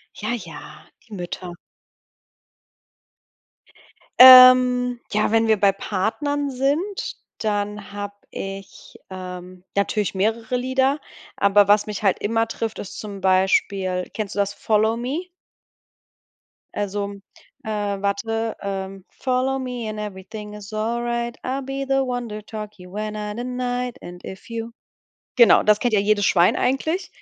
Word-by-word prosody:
Ja, 215 +2 -3
ja, 170 -10 -9 0.2
die 220 - -13
Mütter. 180 -1 -6 2.7
Ähm, 255 -1 +9
ja, 215 0 +1
wenn 225 0 +3
wir 220 -1 +4
bei 200 -1 +5
Partnern 275 +10 -2
sind, 285 +10 -2 0.2
dann 210 -1 -3
habe 205 0 -6 0.2
ich, 195 0 -8
ähm, 180 -1 -8
natürlich 200 0 0
mehrere 225 +4 -1
Lieder. 265 +3 +1 0.4
Aber 200 0 +4
was 205 0 +4
mich 210 -2 -5
halt 195 -3 +2
immer 225 +2 0
trifft, 225 -1 -4
ist 195 - -7
zum 200 -3 -7
Beispiel 185 0 +1
kennst 215 -2 -4
du - - -4
das, 200 0 0
„Follow 220 +2 +1
Me”? 275 +10 -3 1.5
Also, 205 0 -3 0.5
äh, - - -6 0.3
warte, 225 +3 -1
ähm. 195 -1 -5
Follow 260 +1 -1
me 250 -3 -4
and 215 0 -6
everything 210 +1 -7
is 210 0 -10
all 230 +3 -1
right. 235 0 -2
I'll 265 +2 -2
be 270 +1 -4
the 270 0 +1
one 245 -2 -3
to 210 0 -6
tuck 210 0 -8
you 180 +1 -13
in 215 0 -3
at 210 +1 -5
night. 250 0 -3
And 175 0 -10
if 190 +4 -10
you 230 0 -5 0.7
Genau, 235 - +7
das 210 -1 +4
kennt 240 -3 +1
ja 205 - +4
jedes 205 -1 +2
Schwein 175 0 +4
eigentlich. 315 +8 -1
215 Hz, 140 wpm, -22 LUFS, 200-245 Hz, 2.7 s, Ähm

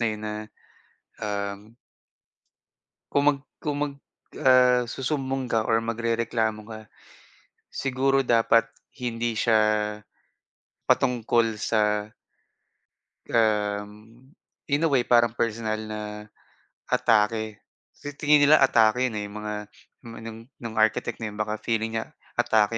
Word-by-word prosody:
na 115 - +2
'yon 110 -1 -5
na, 105 - -3 0.9
um 100 -1 -3 1.5
Kung 140 - +2
mag 140 -1 -1 0.2
kung 145 -1 -2
mag, 145 -1 -3 0.5
ah 125 -1 +5
susumbong 135 +1 -2
ka 110 -1 +2
or 110 - +3
magrereklamo 115 -1 -1
ka, 110 -1 -7 0.9
siguro 135 0 +1
dapat 115 -1 +4 0.3
hindi 120 -2 -2
siya, 110 -2 +4 1.3
patungkol 115 -2 +2
sa 105 -1 +1 1.2
um, 105 -2 +1 0.8
in 145 +3 +2
a - - +2
way 135 -3 +3
parang 120 -1 +3
personal 110 -1 -1
na 110 0 -6 0.9
atake. 110 -1 +1 0.3
Kasi 145 - -8
tingin 150 0 +4
nila 150 0 +6
atake 125 -1 +4
yun 110 - -6
eh, 105 - -3
yung 105 +1 -9
mga 105 0 -4 0.5
nung 115 -1 -11
anong 115 0 -8 0.2
nung 115 -1 -6
architect 110 +2 +1
na 115 - -3
yun, 105 - -11
baka 105 0 -2
feeling 115 -1 -1
niya 110 - -4 0.3
atake 115 -2 +3
115 Hz, 120 wpm, -25 LUFS, 110-125 Hz, 1.5 s, nila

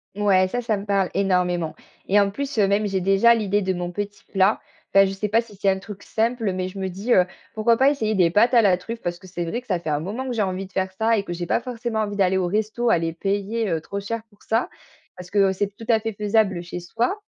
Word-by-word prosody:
Ouais, 195 -2 +3
ça, 245 +6 -2
ça 225 -3 0
me 200 - -7
parle 195 -2 +1
énormément, 180 -4 0 0.3
et 205 +2 +5
en 200 0 +1
plus, 280 +4 -4
heu, 205 -2 +4
même, 205 +1 +2
j'ai 195 -1 -1
déjà 195 +5 +5
l'idée 205 -2 0
de 190 -1 0
mon 175 -1 -4
petit 205 +2 -5
plat. 195 +2 +3 0.3
Enfin, 195 0 +7
je 190 - -2
sais 195 +2 -3
pas 225 +3 +3
si 220 -4 -15
c'est 200 - -2
un 190 - +2
truc 200 0 -10
simple, 225 -2 -1
mais 185 0 -2
je 195 +1 -9
me 190 - -2
dis, 195 +6 -4
heu: 180 -5 +6 0.3
«Pourquoi 225 +2 +3
pas 265 +4 +4
essayer 220 -7 0
des 180 -3 +4
pâtes 225 +7 +4
à 235 - +7
la 190 -4 +4
truffe?» 230 +6 -7
Parce 175 0 -3
que 185 - -14
c'est 175 -1 -4
vrai, 170 +8 -3
que 250 - -19
ça 185 - +1
fait 165 -2 -6
un 145 -1 +1
moment 210 - -4
que - - -2
j'ai 225 - 0
envie 190 -1 -2
de - - -26
faire 190 0 -1
ça 220 +3 +2
et 200 - -1
que 175 - -5
j'ai 175 0 -4
pas - - +2
forcément 235 -2 -4
envie 205 -1 -2
d'aller 190 -1 +2
au 185 -2 0
resto, 215 +5 0
aller 165 -1 +2
payer, 200 +6 -2
heu, 165 -2 -1
trop 200 +5 -5
cher 225 +3 -4
pour 205 -2 -27
ça. 225 +2 0 0.5
Parce 180 -1 -10
que, - - -2
heu, - - 0
c'est 200 +1 -2
tout 225 - -10
à 225 -2 +5
fait 225 0 -4
faisable 205 -3 +1
chez 175 0 -6
soi, 235 - -2
200 Hz, 280 wpm, -23 LUFS, 185-225 Hz, 0.5 s, Enfin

